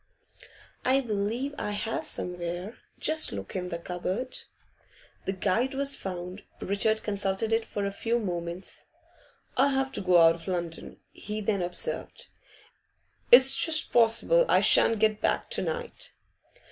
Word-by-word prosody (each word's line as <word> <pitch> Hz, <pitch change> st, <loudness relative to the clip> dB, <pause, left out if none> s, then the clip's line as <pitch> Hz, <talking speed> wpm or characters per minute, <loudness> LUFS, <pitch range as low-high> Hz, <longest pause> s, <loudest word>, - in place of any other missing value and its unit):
'I 265 Hz, +2 st, +3 dB
believe 230 Hz, +4 st, -2 dB
I 210 Hz, -, -3 dB
have 220 Hz, +2 st, -3 dB
somewhere. 180 Hz, +4 st, -5 dB, 0.2 s
Just 315 Hz, 0 st, +1 dB
look 100 Hz, -1 st, -7 dB
in 180 Hz, -1 st, -3 dB
the 170 Hz, -, -4 dB
cupboard.' 185 Hz, +9 st, -4 dB, 0.9 s
The -, -, -1 dB
guide 225 Hz, +7 st, -1 dB
was 280 Hz, 0 st, +1 dB
found. 180 Hz, +1 st, -6 dB, 0.2 s
Richard 215 Hz, +3 st, 0 dB
consulted 200 Hz, +1 st, -1 dB
it 225 Hz, 0 st, +2 dB
for 205 Hz, -2 st, -4 dB
a 200 Hz, -, -2 dB
few 230 Hz, +4 st, -1 dB
moments. 175 Hz, -4 st, -5 dB, 0.7 s
'I 265 Hz, +2 st, +5 dB
have 270 Hz, -1 st, 0 dB
to -, -, -3 dB
go 180 Hz, -2 st, +4 dB
out 165 Hz, 0 st, +6 dB
of 165 Hz, +1 st, -12 dB
London,' 170 Hz, -3 st, -5 dB
he 210 Hz, +1 st, -6 dB
then 205 Hz, -2 st, -1 dB
observed. 180 Hz, -, -3 dB, 1.0 s
'It's 260 Hz, +2 st, +9 dB
just 320 Hz, -1 st, +4 dB
possible 235 Hz, -, +4 dB
I -, -, +5 dB
shan't 225 Hz, -, +4 dB
get 215 Hz, 0 st, +1 dB
back -, -, -1 dB
to -, -, 0 dB
night. 485 Hz, 0 st, -5 dB
210 Hz, 145 wpm, -27 LUFS, 180-250 Hz, 1.0 s, It's